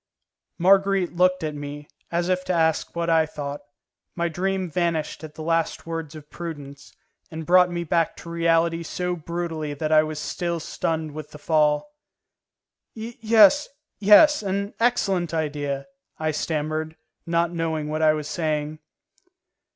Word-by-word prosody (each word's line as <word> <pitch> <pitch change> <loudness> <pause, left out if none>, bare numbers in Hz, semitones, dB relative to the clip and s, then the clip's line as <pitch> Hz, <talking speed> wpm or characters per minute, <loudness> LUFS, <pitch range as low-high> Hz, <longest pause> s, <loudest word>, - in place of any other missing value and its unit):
Marguerite 195 0 +3
looked 185 0 +3
at 155 -1 -2
me, 145 0 -7 0.2
as 170 +1 0
if 185 0 0
to 185 - 0
ask 160 -2 +2
me - - -32
what 170 0 -1
I 160 -1 +3
thought. 145 -1 -6 0.5
My 170 0 0
dream 190 +2 -1
vanished 165 -2 -2
at 155 -1 -9
the 155 - -7
last 165 0 0
words 165 -2 -5
of 150 -1 -12
Prudence, 145 -5 -8 0.3
and 160 0 -7
brought 180 +1 +5
me 175 -1 -3
back 165 0 0
to 170 - -10
reality 165 0 +2
so 180 +2 -3
brutally 165 -2 -4
that 155 +2 -3
I 155 0 +7
was 155 0 -4
still 170 +2 -3
stunned 160 0 -3
with 150 0 -8
the - - -11
fall. 150 - +2 1.1
"Yes, 225 +3 +4 0.3
yes, 215 +9 +7
an 200 0 -2
excellent 195 -8 +1
idea," 145 -3 -2 0.3
I 155 0 -1
stammered, 155 +1 -2 0.3
not 170 0 +1
knowing 160 -3 -2
what 155 +1 -2
I 155 -1 +5
was 150 -1 -4
saying. 155 -2 -2
165 Hz, 150 wpm, -24 LUFS, 155-180 Hz, 1.1 s, I